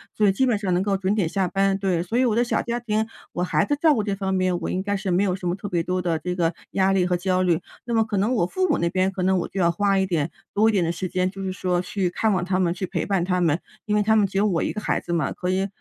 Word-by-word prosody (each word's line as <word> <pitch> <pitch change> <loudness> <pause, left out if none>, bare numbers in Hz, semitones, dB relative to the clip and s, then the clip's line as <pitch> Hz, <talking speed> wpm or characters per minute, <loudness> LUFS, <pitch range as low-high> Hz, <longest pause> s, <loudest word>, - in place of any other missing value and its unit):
所 210 - +3
以 - - +5
基 230 +7 +1
本 235 -5 +1
上 195 -3 -2
能 180 - +1
够 200 -1 +1
准 190 +1 0
点 200 -6 +1
下 190 +2 0
班。 195 +1 +1
对， 185 -4 0
所 180 +6 -5
以 - - +4
我 225 -4 +1
的 240 - +3
小 240 - 0
家 240 0 -2
庭 220 -2 -1 0.3
我 - - -2
孩 160 -4 +1
子 290 - +1
照 315 -3 +5
顾 215 - 0
这 200 -1 -1
方 195 -1 -2
面， 185 -2 +1
我 - - -4
应 185 - -2
该 205 0 -1
是 195 0 -3
没 180 +2 +2
有 185 -3 +1
什 185 -1 -5
么 175 - 0
特 205 - -7
别 175 -3 0
多 180 +2 -1
的 165 -2 0
这 180 +2 -3
个 170 -1 +1 0.2
压 195 0 +3
力 190 -2 +3
和 180 0 +1
焦 185 +1 0
虑。 175 -3 +2 0.3
那 235 -1 -1
么 225 - +4
可 215 -2 -3
能 215 +6 +1
我 175 - +2
父 370 - -1
母 295 - +3
那 170 - 0
边， 185 +2 +1
可 190 -1 -3
能 190 +1 +3
我 - - -3
就 195 - -5
要 170 -2 +3
花 195 +3 +1
一 190 - +2
点 165 -5 -1 0.2
多 215 +2 +3
一 - - +3
点 195 -4 +2
的 165 - 0
时 175 +2 -4
间， 185 0 0
就 195 0 -8
是 190 - -2
说 180 -1 -1
去 185 0 -1
看 215 +5 0
望 185 -2 0
他 185 0 0
们、 175 -2 +2
去 185 +1 -4
陪 - - -3
伴 195 -3 0
他 180 0 0
们。 160 -3 +2 0.3
因 210 - 0
为 210 - +3
他 220 +1 +3
们 210 -2 +4
只 195 - -5
有 200 - +3
我 175 -5 0
1 - - -1
个 210 - -4
孩 - - 0
子 175 - -5
嘛， 165 -5 0
所 180 - -2
以 190 +1 +1
190 Hz, 360 characters per minute, -23 LUFS, 180-205 Hz, 0.3 s, 以